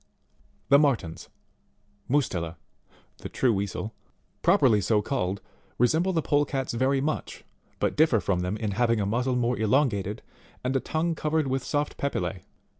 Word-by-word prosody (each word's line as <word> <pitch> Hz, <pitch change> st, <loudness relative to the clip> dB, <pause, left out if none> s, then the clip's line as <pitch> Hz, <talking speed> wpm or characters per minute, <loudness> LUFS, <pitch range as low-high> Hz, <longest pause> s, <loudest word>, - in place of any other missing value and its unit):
The 140 Hz, +1 st, +7 dB
MARTENS, 115 Hz, -, 0 dB, 0.8 s
Mu&tela, 90 Hz, -, 0 dB, 0.6 s
(the -, -, -7 dB
true 125 Hz, -3 st, +2 dB
Weasel) 100 Hz, +2 st, -3 dB, 0.5 s
properly 110 Hz, -5 st, +4 dB
so 105 Hz, +2 st, +2 dB
called, 100 Hz, -6 st, -2 dB, 0.4 s
resemble 160 Hz, +10 st, +2 dB
the 165 Hz, -4 st, 0 dB
Polecats 145 Hz, -3 st, 0 dB
very 130 Hz, +3 st, +2 dB
much, 155 Hz, +2 st, -3 dB, 0.3 s
but -, -, 0 dB
differ 150 Hz, -7 st, +4 dB
from 95 Hz, -1 st, 0 dB
them 90 Hz, +4 st, -2 dB
in 110 Hz, -2 st, -2 dB
having 115 Hz, +2 st, +2 dB
a 100 Hz, -, 0 dB
muzzle 125 Hz, +5 st, 0 dB
more 125 Hz, -1 st, 0 dB
elongated, 110 Hz, -4 st, +1 dB, 0.4 s
and 130 Hz, +2 st, -1 dB
a -, -, +3 dB
tongue 165 Hz, +5 st, -1 dB
covered 155 Hz, 0 st, 0 dB
with 135 Hz, -1 st, -1 dB
soft 145 Hz, +1 st, -2 dB
papillae. 90 Hz, -10 st, -3 dB
125 Hz, 145 wpm, -27 LUFS, 100-140 Hz, 0.8 s, The